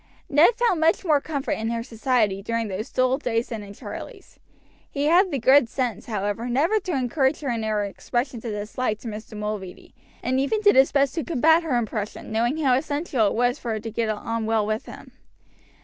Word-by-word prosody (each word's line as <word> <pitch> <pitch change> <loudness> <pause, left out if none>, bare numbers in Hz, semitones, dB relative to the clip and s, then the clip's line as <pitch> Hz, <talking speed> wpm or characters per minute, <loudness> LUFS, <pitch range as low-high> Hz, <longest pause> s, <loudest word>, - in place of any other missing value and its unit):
Ned 330 +8 +5
found 470 -8 +1
much 325 +4 +2
more 300 -4 +3
comfort 280 -3 -3
in 225 +1 -1
her 230 0 -2
society 225 -4 0
during 230 +1 -2
those 200 +6 -4
dull 255 +1 +1
days 235 -3 -1
than 225 -3 -5
in 200 0 -10
Charlie's. - - -10 0.5
He 285 0 -2
had 355 +5 +5
the 285 - -1
good 260 0 +5
sense, 240 -6 -3
however, 210 +2 -2
never 315 - +2
to 370 -3 -4
encourage 265 +3 0
her 275 -4 -2
in 230 -1 -2
her 215 -1 0
expressions 240 +4 -3
of 230 - -4
dislike 210 +2 -2
to - - -8
Mr. 215 0 -7
Mulready, 210 -3 -6 0.3
and 260 +1 +1
even 280 +11 +1
did 410 -1 +5
his 265 +1 +5
best 275 -1 +2
to 320 - -2
combat 320 +2 +3
her 315 -7 -1
impression, 215 -3 -4
knowing 235 +6 +1
how 275 -5 +2
essential 285 -4 0
it - - -1
was 245 +1 +1
for 230 - -3
her 220 - -2
to 225 +1 -6
get 225 0 -1
on 220 +1 -3
well 220 -2 +2
with 215 +1 -3
him. - - -11
245 Hz, 210 wpm, -24 LUFS, 220-285 Hz, 0.5 s, Ned